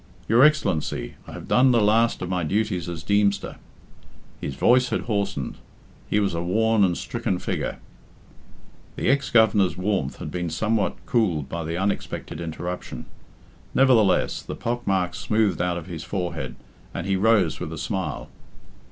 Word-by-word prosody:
"Your 115 +3 +5
Excellency, 140 - +1
I - - -9
have - - -8
done 130 +1 +5
the 120 -2 +4
last 110 0 +3
of 90 - -4
my 90 -2 -1
duties 95 0 -1
as 80 -2 -6
Deemster." 100 +1 +1 0.8
His 70 - -4
voice 125 - +4
had 115 - -1
hoarsened. 100 - -2 0.5
He 105 - +2
was 100 -3 0
a 85 - -2
worn 110 +4 +2
and 90 -3 +2
stricken - - -2
figure. - - -3 1.2
The - - 0
ex 140 0 +2
Governor's 105 -5 +4
warmth 90 -8 -1
had 75 - -6
been 90 -1 -2
somewhat 105 +5 0
cooled 90 - +1
by 85 +3 -3
the 85 +2 -3
unexpected 95 -3 -3
interruption. 85 +2 -5 0.7
Nevertheless, 115 -8 +4
the - - -6
pock 120 +1 -3
marks 90 -4 0
smoothed 105 +3 +1
out 90 -1 0
of 85 - -6
his 85 -3 -7
forehead, 85 -11 -4 0.4
and 85 - -3
he 95 0 +1
rose 100 -4 +3
with 80 - -5
a 80 - -6
smile. 90 -3 -3
95 Hz, 160 wpm, -24 LUFS, 85-110 Hz, 1.2 s, Your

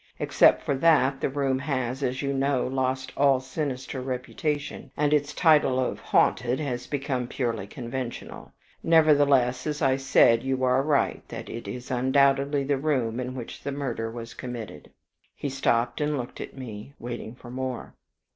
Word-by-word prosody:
Except - - +4
for - - 0
that, 140 -3 +3
the - - +1
room 135 -1 0
has, 130 -2 -2
as 130 0 -1
you 140 0 0
know, 135 -1 +1
lost 130 0 -1
all 140 -2 +4
sinister 130 -1 -4
reputation, 140 +3 -3
and 150 0 +2
its 145 0 +2
title 150 -7 +4
of 130 - -1
'haunted' 125 +3 +2
has 125 -4 -3
become 135 -3 -2
purely 115 -6 -2
conventional. 120 +1 -6 0.3
Nevertheless, 145 -6 +4
as 150 -1 -2
I 135 -3 +2
said, 125 -3 +4
you 130 -1 -1
are 130 +1 +3
right 145 0 +1
that - - -7
is 125 +2 -7
undoubtedly 140 +2 +2
the 140 0 0
room 130 -6 0
in 130 0 -4
which 120 -3 -7
the 140 - -4
murder 125 -5 -3
was 115 0 -8
committed." 120 -3 -7 0.5
He 140 - -4
stopped 125 0 0
and 150 0 0
looked 125 -2 -6
up - - -4
at - - -20
me, 120 0 -8
waiting 120 -1 -6
for 120 -1 -12
more. 130 -1 -4
130 Hz, 165 wpm, -26 LUFS, 125-140 Hz, 0.5 s, Except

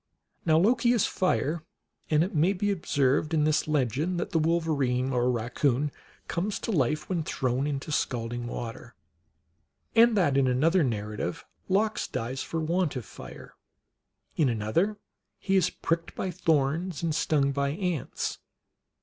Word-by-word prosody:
Now 160 -1 +5
Loki 235 +6 +4
is 230 - +3
Fire; 170 -3 0 0.5
and 155 0 +4
it 185 - -4
may 170 +5 +3
be 205 +2 0
ob 190 -5 -5
served 145 +3 +2
in 150 - +3
this 155 0 +2
legend 150 - 0
that - - -3
the 165 - +2
wolverine 145 -6 +1
or 125 0 +2
raccoon 125 +4 0 0.4
comes 195 +5 -1
to - - -2
life 150 - +1
when 180 -3 -1
thrown 135 -3 -1
into 140 +1 -3
scalding 120 -3 -2
water, 120 0 -7 1.0
and 230 -1 +6
that 145 -8 +3
in 135 -1 +4
another 160 +8 +3
narrative 105 -6 -3 0.2
Lox 210 +3 +1
dies 125 +4 -3
for 165 - -3
want 165 0 0
of 125 -4 -4
fire; - - -11 0.8
in 150 -5 +3
another 120 - 0 0.4
he 195 - 0
is 185 -3 +4
pricked 165 0 -2
by 190 - -2
thorns 165 0 0
and 165 -2 0
stung 145 -2 +2
by 140 0 0
ants. 175 -1 -3
155 Hz, 150 wpm, -28 LUFS, 130-175 Hz, 1.0 s, and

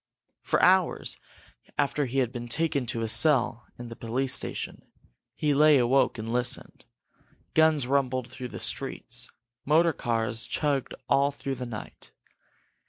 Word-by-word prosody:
For - - 0
hours, 185 -1 +3 0.6
after 145 0 0
he 130 +3 -4
had 125 -3 +1
been 120 -1 -6
taken 140 0 -1
to 115 0 -2
a - - -1
cell 125 -2 +3
in 120 -1 -8
the - - -7
central 115 0 -10
police 130 +2 +1
station, - - -5 0.5
he 150 -1 +1
lay 150 +1 +6
awake 130 +1 +2
and 115 +1 -4
listened. 125 0 -2 0.7
Guns 160 -4 +4
rumbled 130 -2 0
through 130 0 -7
the - - -8
streets, - - -1 0.3
motor 160 +3 +3
cars 115 -2 -1
chugged 145 -3 -1
all 140 +1 +3
through 140 -1 -5
the 125 -1 -5
night. 110 -3 -9
130 Hz, 150 wpm, -27 LUFS, 120-145 Hz, 0.7 s, lay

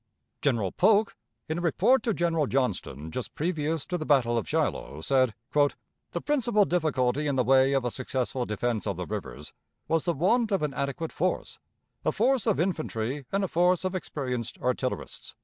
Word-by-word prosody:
General 115 -10 +1
Polk, 215 -1 +3 0.3
in 160 +2 -2
a - - -4
report 225 - +3
to 230 - 0
General 165 -6 +1
Johnston 90 - -2
just 125 - -5
previous 160 -2 -1
to 180 -1 -3
the - - -2
battle 130 -6 +3
of 115 - -2
Shiloh, 75 - -1
said: 130 +3 +2 0.2
"The 145 -1 -1
principal 240 -8 +3
difficulty 150 -5 +1
in 140 - 0
the 130 - +3
way 135 +2 +4
of 135 -2 +1
a 120 - 0
successful 130 0 -2
defense 110 +1 -1
of 100 -4 -2
the 90 - -3
rivers, 60 -5 -6 0.3
was 165 0 +1
the 170 - +2
want 220 - +2
of 195 -5 +1
an 150 -2 -1
adequate 145 +4 -3
force 185 +2 -2 0.4
a - - +2
force 250 +1 +2
of 215 - +2
infantry 145 - -2
and 195 +1 +1
a - - +1
force 180 +1 +2
of 185 - -1
experienced 125 - -3
artillerists." 125 0 -3
145 Hz, 180 wpm, -27 LUFS, 125-180 Hz, 0.4 s, way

